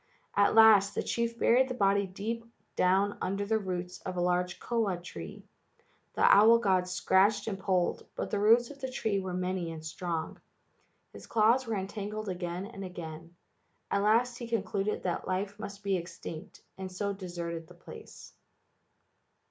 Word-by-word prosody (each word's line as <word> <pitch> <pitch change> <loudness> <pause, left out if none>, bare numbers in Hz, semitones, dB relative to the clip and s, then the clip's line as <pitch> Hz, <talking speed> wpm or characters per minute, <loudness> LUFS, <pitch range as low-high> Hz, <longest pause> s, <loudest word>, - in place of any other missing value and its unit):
At 200 +1 +4
last 215 -3 +7
the - - -1
chief 235 0 -2
buried 255 +3 +4
the 255 - -3
body 200 -2 +2
deep 220 +5 -4 0.3
down 195 +3 +2
under 195 +2 -1
the 220 +1 +1
roots 180 -2 -5
of 185 -1 -5
a - - 0
large 180 0 0
koa 225 -6 -1
tree. 90 - -9 0.7
The - - 0
owl 220 +3 +7
god 190 -5 +1
scratched 190 +4 +2
and 195 -3 -3
pulled, 185 -2 0
but - - -4
the 205 - 0
roots 230 +4 +4
of 280 -1 -13
the 265 - -3
tree 220 -5 -1
were 185 -1 -4
many 180 -2 -2
and 160 -1 -8
strong. 165 0 -4 0.7
His - - -11
claws 230 +3 +3
were 225 - -1
entangled 205 +2 -4
again 180 0 -4
and 205 -2 -8
again. 165 -2 -8 0.6
At 200 - +2
last 235 +4 +2
he 240 - -6
concluded 210 -2 -1
that 175 -2 -2
life 195 +2 -2
must 200 -1 -8
be 200 -1 +1
extinct 170 -2 -8 0.2
and 190 -1 -5
so 200 +2 -2
deserted 170 -3 -6
the - - -15
place. - - -12
195 Hz, 165 wpm, -30 LUFS, 180-215 Hz, 0.7 s, last